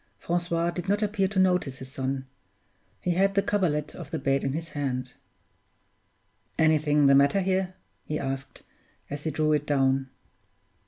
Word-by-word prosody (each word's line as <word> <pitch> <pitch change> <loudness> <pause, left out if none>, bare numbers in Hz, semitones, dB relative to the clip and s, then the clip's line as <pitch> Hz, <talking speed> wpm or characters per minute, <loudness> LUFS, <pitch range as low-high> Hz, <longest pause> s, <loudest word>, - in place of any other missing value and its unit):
Francois 170 0 -1
did 175 +2 -5
not 205 +2 +2
appear 205 -2 +1
to 195 +1 -5
notice 180 -8 +2
his 130 0 -10
son; 135 0 -3 0.8
he 180 - 0
had 195 +3 +2
the 200 - +3
coverlet 165 -8 0
of - - -9
the - - -2
bed 135 0 0
in 135 - -1
his 165 +2 -4
hand. 130 -4 -3 1.4
"Anything 155 -2 +3
the 140 - +6
matter 140 +8 +4
here?" 185 0 0 0.3
he 150 - -3
asked, 135 -1 -5 0.5
as 145 +2 -5
he - - +1
drew 155 +1 +1
it 150 0 0
down. 135 -2 +2
155 Hz, 160 wpm, -27 LUFS, 135-180 Hz, 1.4 s, the